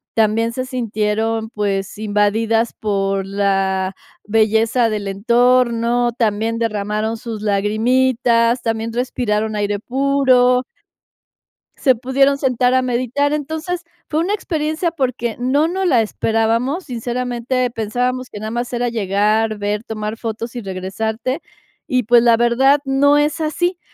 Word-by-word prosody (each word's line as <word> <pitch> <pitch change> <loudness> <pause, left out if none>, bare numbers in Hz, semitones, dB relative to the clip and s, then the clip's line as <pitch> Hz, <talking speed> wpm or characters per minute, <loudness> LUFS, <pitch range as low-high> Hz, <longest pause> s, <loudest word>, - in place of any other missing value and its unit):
también 225 +1 +2
se 255 +2 -4
sintieron, 225 -2 -1
pues, 200 -3 -2
invadidas 220 +2 +1
por 195 -2 -1
la 195 -1 0 0.3
belleza 225 +2 +2
del 210 -2 -3
entorno. 240 +3 +2
También 225 -1 -1
derramaron 215 0 -1
sus 225 -2 -7
lagrimitas. 230 +3 +2
También 225 0 -2
respiraron 220 -3 -1
aire 205 -1 -1
puro. 255 0 +3 1.1
Se 260 -2 +3
pudieron 275 +3 +2
sentar 255 -2 +1
a 260 - +4
meditar. 255 +3 0
Entonces 320 +4 -3 0.3
fue 310 - 0
una 375 +5 0
experiencia 320 -3 -1
porque 255 -6 -2
no 275 +5 +2
nos 375 +2 -1
la 250 -8 +4
esperábamos, 225 - 0
sinceramente 245 0 -2
pensábamos 250 +3 -2
que 210 - -8
nada 215 +1 -5
más 240 +1 -3
era 245 0 0
llegar, 215 0 +1
ver, 205 +1 -2
tomar 215 -1 -5
fotos 230 +1 -5
y 240 - -4
regresarte, 220 - -3 0.5
y, 255 -1 +2
pues, 235 +2 +5
la 235 -1 +4
verdad, 260 +4 +4
no 280 +2 +3
es 300 +3 +1
así. 350 +3 -1
235 Hz, 130 wpm, -19 LUFS, 215-255 Hz, 1.1 s, pues